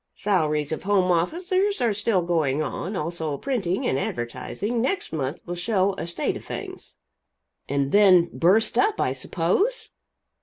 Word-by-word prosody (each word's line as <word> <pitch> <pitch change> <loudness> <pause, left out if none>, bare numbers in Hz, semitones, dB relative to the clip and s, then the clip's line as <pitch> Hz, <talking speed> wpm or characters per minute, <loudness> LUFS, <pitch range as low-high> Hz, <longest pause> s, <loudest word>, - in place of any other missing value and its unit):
Salaries 155 -7 0
of 160 - -3
home 190 -2 +2
officers 370 - 0
are 235 -4 +2
still 205 -2 +1
going 155 -4 +1
on; 185 +6 -4
also 160 -3 -2
printing 200 - -1
and 130 - +1
advertising. 130 - -3
Next 265 - -1
month 145 0 -3
will 175 - -4
show 195 +2 +1
a 170 - -5
state 170 - -2
of - - -12
things!" - - -7 0.7
"And 140 0 0
then 185 -4 +6
burst 195 +7 +3
up, 420 +1 +2
I - - +1
suppose?" 180 - 0
180 Hz, 150 wpm, -24 LUFS, 155-220 Hz, 0.7 s, then